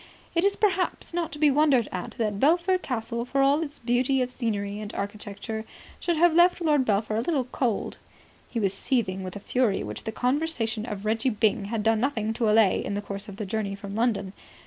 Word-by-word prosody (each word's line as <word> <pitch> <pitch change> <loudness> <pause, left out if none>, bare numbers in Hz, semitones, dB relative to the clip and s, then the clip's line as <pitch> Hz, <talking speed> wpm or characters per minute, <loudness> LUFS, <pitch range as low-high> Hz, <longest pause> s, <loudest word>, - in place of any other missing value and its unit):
It 335 - +2
is 400 0 +3
perhaps 375 -4 0
not 340 -2 -1
to 295 - -7
be 295 -1 +4
wondered 275 -5 +3
at 180 -1 -5
that 210 -3 -1
Belpher 345 - +3
Castle, 235 -5 -3
for 275 +2 +1
all 280 +3 +4
its 295 -2 -5
beauty 250 +3 +1
of 250 - -4
scenery 205 -5 -2
and 210 0 -6
architecture, 205 +2 -5 0.4
should 345 -2 0
have 345 +1 +5
left 350 +2 +5
Lord 300 -6 +2
Belpher 215 0 +1
a - - +1
little 280 0 0
cold. 245 -3 -2 0.5
He 235 - -2
was 195 -3 +1
seething 195 -4 -1
with 185 0 -6
a - - -5
fury 235 -1 +1
which - - -6
the 220 - -2
conversation 245 -4 -1
of 205 -2 -5
Reggie 220 +4 +1
Byng 215 -3 +1
had 215 +1 -2
done 225 0 +3
nothing 225 -4 0
to 225 -1 +1
allay 215 -2 +4
in 200 - -3
the 205 - -2
course 200 +1 -6
of 200 - -8
the 210 - -3
journey 200 -1 -2
from 200 0 -8
London. 205 -4 0
230 Hz, 215 wpm, -26 LUFS, 205-280 Hz, 0.5 s, have